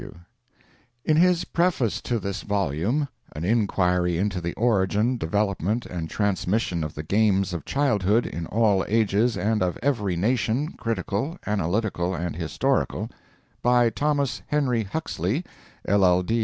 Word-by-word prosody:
B.W. 85 - -10 0.9
In 155 - +3
his 180 0 +4
preface 170 - 0
to 120 - -1
this 100 -1 -4
volume 100 - 0 0.3
["An 75 +3 -3
Inquiry 90 -5 +1
into 95 -1 -1
the 85 0 -4
Origin, 110 +1 +2
Development, 100 +4 0
and 85 -2 -5
Transmission 100 -3 0
of 75 - -5
the 75 - -5
Games 100 0 +2
of 85 -4 -5
Childhood, 115 -6 +2
in 80 +1 -5
all 105 -4 +2
Ages 110 +1 +2
and 110 +1 0
of 90 -1 0
every 110 -10 0
Nation, 120 - 0
Critical, 115 - -2
Analytical, 95 -2 -1
and 85 -2 -3
Historical." 110 - -1 0.5
By 120 -1 +4
Thomas 145 -1 0
Henry 125 -7 +1
Huxley, 110 - -2 0.4
L. 90 -2 +4
105 Hz, 130 wpm, -25 LUFS, 90-120 Hz, 0.9 s, his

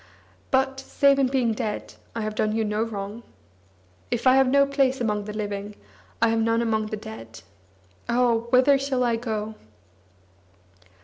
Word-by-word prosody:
"But, 265 0 +1
save 275 +1 +2
in 270 - +3
being 255 -3 +1
dead, 210 -1 -4 0.2
I 230 - -2
have 215 0 -3
done 215 0 0
you 225 -1 0
no 210 +1 -1
wrong. 210 0 -4 0.9
If 240 0 -2
I 255 - +7
have 270 -1 +5
no 280 +2 +4
place 275 -1 +1
among 210 -3 -1
the 210 - -5
living, 205 -1 -5 0.5
I 230 - +5
have 225 0 +1
none 230 +1 +2
among 220 -2 0
the 215 - -4
dead. 115 - -10 0.7
Oh! 235 -1 +2
whither 260 +3 +5
shall 270 -2 0
I 235 -1 +2
go?" 220 -2 -4
230 Hz, 165 wpm, -25 LUFS, 215-260 Hz, 0.9 s, I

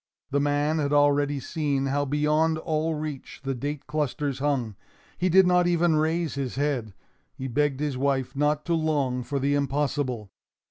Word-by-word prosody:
The 140 - +2
man 145 +2 +1
had 145 -1 0
already 145 -1 +3
seen 140 -1 -1
how 140 +1 0
beyond 150 +3 +2
all 160 0 -1
reach 150 -3 -6
the 135 0 -1
date 145 +3 -4
clusters 145 -2 -2
hung. 135 -7 -1 0.4
He 185 - 0
did 190 +2 +6
not 180 0 +4
even 170 -1 +3
raise 160 +1 0
his 135 -3 -3
head. 130 -7 -1 0.4
He 135 - -5
begged 140 +2 0
his 145 -4 -2
wife 135 -1 0
not 150 +1 +1
to 170 - 0
long 145 -6 0
for 140 +3 -3
the 140 +1 +1
impossible. 140 -6 -1
145 Hz, 170 wpm, -26 LUFS, 135-155 Hz, 0.4 s, did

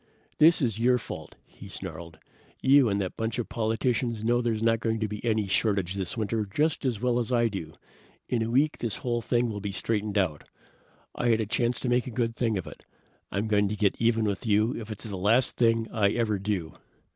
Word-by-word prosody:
"This 160 0 +6
is 115 -3 0
your 125 +2 +4
fault!" 115 - -8
he - - -13
snarled. 85 -2 -7 0.4
"You 135 -2 +5
and 100 0 0
that 95 -2 -3
bunch 115 +1 -2
of 120 - -3
politicians 115 0 -1
know 120 +2 +2
there's 115 -2 -1
not 115 0 +3
going 115 -1 -1
to 110 - 0
be 105 0 -7
any 110 -3 +1
shortage 100 -2 +1
this 95 +1 -4
winter 110 0 -1
just 145 +10 -1
as 120 -5 0
well 125 0 +1
as 120 +1 -2
I 120 -2 +3
do. 80 -6 -6 0.5
In 120 - 0
a 110 - -1
week 140 +6 +2
this 115 -4 -2
whole 120 -1 0
thing 120 +1 +1
will 105 -1 -5
be 100 0 -3
straightened 105 +1 -2
out. 85 -7 0 0.7
I 120 - -2
had 115 -1 +3
a 110 - 0
chance 120 +2 0
to - - -2
make 125 +1 +1
a - - -3
good 115 -1 -1
thing 115 -4 0
of 90 - -4
it. - - -11 0.5
I'm 100 +3 -1
going 105 -2 +2
to 105 - -2
get 105 -2 +2
even 115 -1 +2
with 100 -2 -2
you 110 +1 +2
if 110 -1 -7
it's 110 - -6
the 105 -3 -5
last 110 +7 +3
thing 115 -1 +2
I 105 -3 +3
ever 110 -4 0
do!" 95 -5 -2
110 Hz, 225 wpm, -27 LUFS, 105-120 Hz, 0.7 s, This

